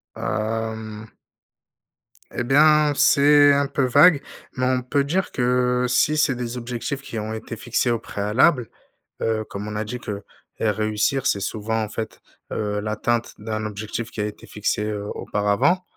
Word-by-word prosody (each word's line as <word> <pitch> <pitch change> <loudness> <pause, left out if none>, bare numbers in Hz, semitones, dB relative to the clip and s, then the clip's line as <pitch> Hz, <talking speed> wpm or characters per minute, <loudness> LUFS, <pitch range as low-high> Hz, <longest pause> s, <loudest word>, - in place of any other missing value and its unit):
Hem. 110 0 -3 1.2
Et 120 - -2
bien, 150 +3 +5
c'est 145 0 +6
un 140 0 +2
peu 135 - -1
vague, 145 +4 +6 0.3
mais 125 0 0
on 130 0 +1
peut 140 +2 +1
dire 180 +7 -1
que, 125 0 +1
si 150 +5 +3
c'est 145 -4 +2
des 120 0 -4
objectifs 125 +3 -4
qui 115 -4 -6
ont 110 +1 -4
été 110 0 -6
fixés 120 +2 0
au 115 - 0
préalable, 115 +6 +1 0.5
heu, 110 -1 0
comme 100 +1 -6
on 105 - -5
a 110 - -2
dit 125 +3 -5
que 100 -3 -6 0.4
et 110 - +1
réussir, 110 +6 0
c'est 100 - +2
souvent, 110 +3 -2
en 105 - -5
fait, 110 0 -6 0.3
heu, 105 -1 -2
l'atteinte 110 +3 -1
d'un 110 0 -4
objectif 110 +2 -5
qui 105 - -4
a - - 0
été 105 - -8
fixé, 105 0 -2
heu, 105 -1 -3
auparavant. 105 - +1
115 Hz, 165 wpm, -23 LUFS, 105-135 Hz, 1.2 s, c'est